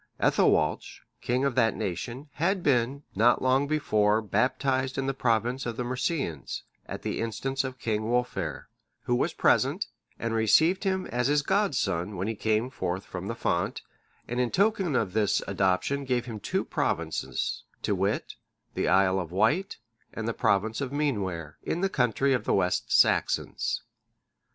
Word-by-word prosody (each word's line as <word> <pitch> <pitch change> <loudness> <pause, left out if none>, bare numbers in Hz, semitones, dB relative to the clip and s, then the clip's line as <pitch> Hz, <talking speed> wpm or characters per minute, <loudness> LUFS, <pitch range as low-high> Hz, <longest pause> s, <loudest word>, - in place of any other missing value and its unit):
Ethelwalch,(616) - - +1 0.2
king 125 +3 0
of 140 - +1
that 115 -3 +2
nation, 110 - -4
had 180 +3 0
been, 135 +1 +1
not 115 +5 +4
long 130 +2 +3
before, 110 -8 +2
baptized 130 +5 0
in 135 - -1
the 135 - 0
province 120 +1 0
of 115 - -4
the 125 - -1
Mercians, 125 - -2 0.2
at - - -6
the - - -2
instance 130 +4 -2
of 130 -1 -5
King 110 -2 -2
Wulfhere,(617) 125 0 -1 0.4
who 120 - 0
was - - 0
present, - - +2 0.3
and 115 0 -2
received 160 - +3
him 190 -1 0
as 125 +1 -1
his 145 0 +2
godson 135 - 0
when 95 +3 -2
he 115 - -1
came 110 +3 0
forth 95 -6 -3
from 95 +1 -6
the 115 - -3
font, 85 -6 -1 0.4
and 120 +1 -2
in 125 -1 +2
token 195 - +1
of 100 -7 0
this 105 -2 +2
adoption 100 +9 +1
gave 125 -2 0
him 115 -4 -6
two - - -1
provinces, - - -2 0.2
to - - +1
wit, - - -1 0.4
the - - -1
Isle 95 +1 +4
of 85 -3 -5
Wight, 155 - +1 0.4
and 115 0 -4
the 115 - 0
province 110 +2 +1
of 135 - -2
the 140 - -6
Meanware, 95 - -2
in 175 - -2
the 195 - +2
country 130 - +2
of 125 - -1
the - - +2
West 90 -2 0
Saxons. - - +2
120 Hz, 165 wpm, -28 LUFS, 105-135 Hz, 0.4 s, not